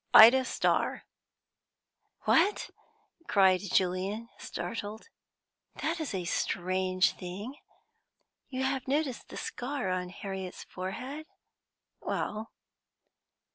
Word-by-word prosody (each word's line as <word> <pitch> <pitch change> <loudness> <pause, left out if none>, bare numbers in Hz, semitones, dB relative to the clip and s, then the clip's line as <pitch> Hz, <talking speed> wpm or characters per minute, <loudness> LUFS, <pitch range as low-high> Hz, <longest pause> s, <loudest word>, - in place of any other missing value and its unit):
"Ida 250 +4 +10
Starr." - - +1 1.2
"What!" 410 +1 +3 0.6
cried 190 -2 +5
Julian 190 +5 +1
startled. 220 - -5 0.7
"That 335 +1 -1
is 300 -10 -3
a 180 -2 -2
strange 185 +1 +1
thing! 195 +8 -6 1.0
You 260 -1 -2
have 265 -1 -1
noticed 275 -2 -1
the - - -8
scar 250 -5 -3
on 180 0 -1
Harriet's 190 0 -6
forehead?" 255 +12 -6 0.7
"Well?" 215 +1 -3
210 Hz, 90 wpm, -30 LUFS, 185-265 Hz, 1.2 s, Ida